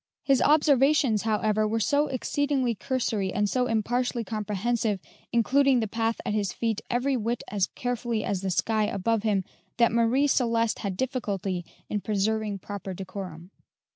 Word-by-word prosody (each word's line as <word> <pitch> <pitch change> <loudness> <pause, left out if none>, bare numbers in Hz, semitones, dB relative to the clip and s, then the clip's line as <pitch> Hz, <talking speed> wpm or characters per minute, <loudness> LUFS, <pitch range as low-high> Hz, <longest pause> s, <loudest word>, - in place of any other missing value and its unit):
His 270 -2 +3
observations, 285 -5 +4
however, 215 -1 +1
were 225 +1 0
so 290 +6 +2
exceedingly 270 -1 0
cursory 220 -5 -1
and 205 +1 +1
so 250 +4 +1
impartially 240 +2 0
comprehensive, 215 0 -1 0.3
including 260 +3 +3
the 220 - -1
path 225 +1 -1
at - - -1
his 205 -3 0
feet 225 0 -2
every 260 +3 +1
whit 235 0 -2
as 200 -2 +1
carefully 240 -3 -2
as 195 -2 -2
the 195 - -2
sky 215 +4 +1
above 210 +2 0
him, 205 -3 +1 0.3
that 235 -1 +4
Marie 235 +5 +3
Celeste 230 -5 +1
had 195 -3 -3
difficulty 200 -8 -2 0.2
in 210 - -2
preserving 215 0 0
proper 195 0 -6
decorum. 185 -2 -7
225 Hz, 150 wpm, -27 LUFS, 205-245 Hz, 0.3 s, observations